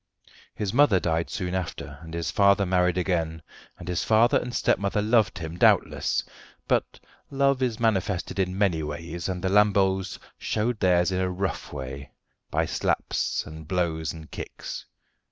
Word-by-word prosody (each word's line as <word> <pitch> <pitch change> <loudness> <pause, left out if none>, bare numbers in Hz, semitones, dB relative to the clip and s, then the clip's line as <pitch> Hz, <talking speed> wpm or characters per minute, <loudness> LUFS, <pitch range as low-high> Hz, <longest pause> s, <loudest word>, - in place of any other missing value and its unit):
His 100 -2 -2
mother 125 -8 +5
died 80 -1 -1
soon 90 -1 -3
after, 85 -5 -4
and 80 0 -8
his 85 -1 -2
father 100 -1 +4
married 90 0 +2
again, 80 -4 -1 0.3
and 90 - -10
his 90 -2 -1
father 115 +2 +4
and 125 - -5
stepmother 100 -3 +1
loved 110 0 +2
him, 85 0 -6
doubtless; - - +3 0.4
but - - 0 0.3
love 140 -1 +2
is 120 -4 0
manifested 100 -4 0
in 95 0 0
many 95 -6 +2
ways, 85 +3 -5
and 90 -1 -4
the 95 - +1
Lamboles 95 -2 +3 0.2
showed 110 +1 -1
theirs 90 -1 +3
in 95 0 0
a 95 - 0
rough 95 +1 -3
way, 70 0 -7 0.4
by - - +1
slaps - - -1
and 80 0 -10
blows 80 -4 -1
and 80 -1 -11
kicks. - - -7
95 Hz, 155 wpm, -26 LUFS, 85-100 Hz, 0.4 s, mother